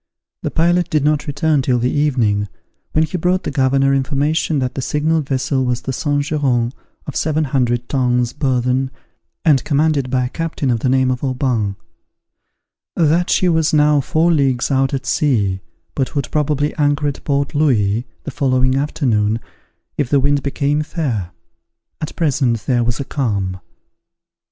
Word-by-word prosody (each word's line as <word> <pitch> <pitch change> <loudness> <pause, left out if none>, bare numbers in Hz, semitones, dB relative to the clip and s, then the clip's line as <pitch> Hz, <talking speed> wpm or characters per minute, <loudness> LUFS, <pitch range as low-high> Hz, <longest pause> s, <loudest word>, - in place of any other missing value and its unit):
The - - -2
pilot 175 +1 +1
did 150 -4 +1
not 150 0 +1
return 145 0 +1
till 125 -1 +1
the 120 +1 0
evening, 120 -9 +1 0.5
when 155 - +3
he 175 +3 -3
brought 180 +2 +1
the - - -3
governor 135 0 +2
information 145 +3 0
that 130 -2 -1
the 135 - -4
signalled 150 +2 0
vessel 130 0 0
was 125 -1 -1
the 135 - -4
Saint 145 0 0
Geran, 130 -5 0 0.3
of 145 - -7
seven 155 0 0
hundred 120 -3 0
tons 125 -3 +1
burthen, 130 -2 0 0.6
and 145 -5 +4
commanded 145 -2 +1
by 125 -1 +1
a - - -3
captain 160 -4 -2
of 115 - 0
the 130 - 0
name 130 0 +2
of 125 +1 -4
Aubin; 125 -6 0 1.2
that 170 +2 +2
she 185 - +3
was 160 -3 +2
now 150 -1 +4
four 160 +6 +1
leagues 135 -5 +1
out 135 0 +2
at 135 -2 -3
sea, 105 -12 +1 0.3
but 140 +3 -2
would 140 -2 -2
probably 150 -1 0
anchor 145 0 +1
at 140 - -4
Port 140 -1 -1
Louis 120 -6 +1 0.2
the 145 - -5
following 130 -2 +1
afternoon, 120 -7 0 0.6
if 140 -4 0
the 140 - +3
wind 140 +1 +2
became 145 +1 0
fair: 135 - -3 0.7
at 155 - -5
present 130 -8 0
there 120 -2 +2
was 115 -1 -1
a 140 - -3
calm. 100 -10 -2
140 Hz, 165 wpm, -18 LUFS, 125-150 Hz, 1.2 s, and